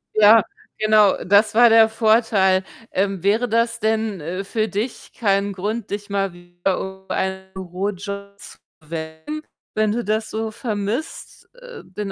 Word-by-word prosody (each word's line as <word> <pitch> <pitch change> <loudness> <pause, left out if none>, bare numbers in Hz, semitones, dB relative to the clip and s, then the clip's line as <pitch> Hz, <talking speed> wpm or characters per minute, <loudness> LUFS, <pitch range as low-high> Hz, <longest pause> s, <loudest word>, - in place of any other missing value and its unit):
Ja, 215 0 +7 0.4
genau, 215 -2 +4
das 200 +3 +4
war 240 +1 +7
der 225 0 +6
Vorteil. 215 -4 +3 0.3
Ähm, 195 -1 -1
wäre 215 +5 +2
das 230 +1 +1
denn, 220 -2 0
äh, 180 +5 -4
für 215 +2 -1
dich 215 +5 -4
kein 200 -2 +1
Grund, 210 +3 -4
dich 205 +1 -5
mal 195 -2 -1
wieder 175 +1 -3
um 190 0 -8
einen 190 0 -3
Bürojob 200 +2 -5
zu - - -12 0.2
bewerben, 160 - -6 0.3
wenn 215 -1 +2
du 235 +2 -1
das 220 +1 -1
so 220 0 -3
vermisst, 215 +6 -4
äh, - - -11
den 195 +1 -6
205 Hz, 150 wpm, -21 LUFS, 190-220 Hz, 0.4 s, Ja